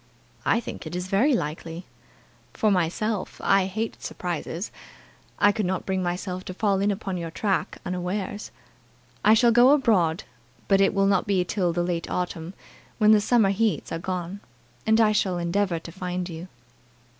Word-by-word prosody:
"I - - +4
think 225 - -7
it 155 - -6
is 180 0 -3
very 245 +9 +3
likely. 165 0 -4 0.7
For 215 - +2
myself, 190 +3 -1
I 195 -1 +3
hate 220 +4 -4
surprises. 175 +1 -4 0.7
I 205 0 +5
could 210 -3 -1
not 185 0 -2
bring 190 -1 -1
myself 180 +1 -3
to 185 - -6
fall 200 -2 +1
in 200 +1 +2
upon 195 -2 -3
your 170 -1 -4
track 195 +2 -1
unawares. 185 +3 -3 0.7
I 215 +2 +6
shall 235 +1 +5
go 240 +2 +6
abroad, 210 - +3 0.4
but 195 -1 +4
it 195 0 +3
will 195 0 +3
not 195 0 +2
be 190 -3 +2
till 180 -2 0
the 175 +1 0
late 175 -1 -2
autumn, 180 0 -3 0.4
when 215 -1 +5
the 215 -1 +6
summer 215 -2 +3
heats 215 +1 0
are 165 - -2
gone, 180 +2 -4 0.5
and 220 +1 +4
I 220 -2 +5
shall 190 -4 +1
endeavour 175 +1 0
to 165 +1 -9
find 180 0 -4
you." 170 0 -7
190 Hz, 170 wpm, -25 LUFS, 175-210 Hz, 0.7 s, I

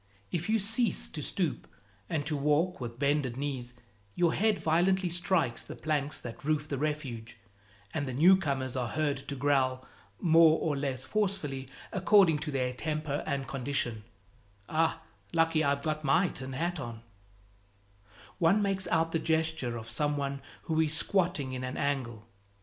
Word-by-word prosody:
If 170 +3 -2
you 225 - +4
cease 220 - +1
to - - -6
stoop - - -2 0.4
and 150 -2 -1
to 155 0 -1
walk 150 +4 +1
with 120 -1 -5
bended 140 -3 +1
knees, 130 -4 -3 0.4
your 170 -2 +3
head 215 0 +2
violently 180 +3 +2
strikes 170 -8 +1
the - - -8
planks 150 -2 -1
that 115 - -8
roof 150 0 0
the 140 -3 -3
Refuge, 135 -7 -3 0.6
and 145 -3 -2
the 130 - -3
newcomers 140 -6 +3
are 125 -2 -1
heard 145 +2 0
to 140 - -4
growl 130 -2 +1 0.3
more 165 -1 +6
or 155 -3 -1
less 135 -2 -2
forcefully, 160 -10 -1 0.2
according 185 -4 +5
to 150 +1 -4
their 130 -2 -1
temper 150 +1 -2
and 140 -3 -2
condition 125 -5 -2 0.6
"Ah, 160 +1 0 0.3
lucky 165 -1 +3
I've 140 -1 +1
got 155 -1 -1
my 165 +6 +3
tin 130 0 -6
hat 170 +5 -2
on:" 115 -4 -7 1.4
One 180 +4 +4
makes 195 -2 0
out 165 0 +1
the 165 - +1
gesture 160 -6 0
of 115 0 -8
some 145 +6 0
one 140 -1 -3 0.2
who 160 0 +1
is 155 -1 +2
squatting 175 -10 +1
in 130 0 -4
an 130 +1 -4
angle. 120 -6 -2
150 Hz, 160 wpm, -30 LUFS, 130-165 Hz, 1.4 s, more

